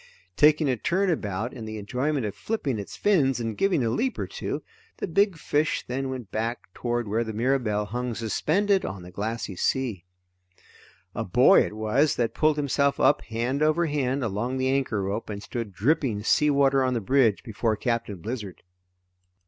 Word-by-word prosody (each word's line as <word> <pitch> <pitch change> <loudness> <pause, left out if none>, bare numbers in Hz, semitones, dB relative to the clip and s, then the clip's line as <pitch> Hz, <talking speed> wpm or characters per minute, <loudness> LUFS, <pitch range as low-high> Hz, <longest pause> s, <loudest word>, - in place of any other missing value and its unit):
Taking 150 +3 +5
a 130 -2 +1
turn 185 - +1
about 110 - -2
in 115 -4 -7
the 110 0 -6
enjoyment 125 +6 -1
of 105 - -3
flipping 140 - -2
its 100 - -7
fins 140 -11 +2
and 115 -2 -3
giving 175 - +2
a 115 - +1
leap 250 - -1
or - - -2
two, - - -5 0.3
the - - -2
big 195 +1 +2
fish 150 0 0
then 130 +2 -3
went 125 -6 -6
back 115 -3 -3
toward 120 -1 -2
where 110 +3 0
the 110 -1 -5
Mirabelle 115 -3 0
hung 120 +3 -3
suspended 185 - +1
on 95 -2 -5
the 90 - -11
glassy 105 +1 -4
sea. 115 -3 -1 1.1
A - - -2
boy - - +6
it - - -5
was 110 +8 +1
that 120 -2 0
pulled 155 -1 +2
himself 140 -1 +1
up - - +4
hand 120 +5 -2
over 155 +3 +3
hand 140 -3 -1
along 115 +4 -2
the 130 0 0
anchor 130 -7 0
rope 100 +4 -3
and 100 -1 -5
stood 115 0 -5
dripping 115 - 0
sea 150 +6 +3
water 135 -1 +3
on 130 -1 +1
the - - +1
bridge 115 -1 +2
before 110 -1 -1
Captain 115 -1 -2
Blizzard. 105 -1 -6
125 Hz, 180 wpm, -26 LUFS, 110-140 Hz, 1.1 s, boy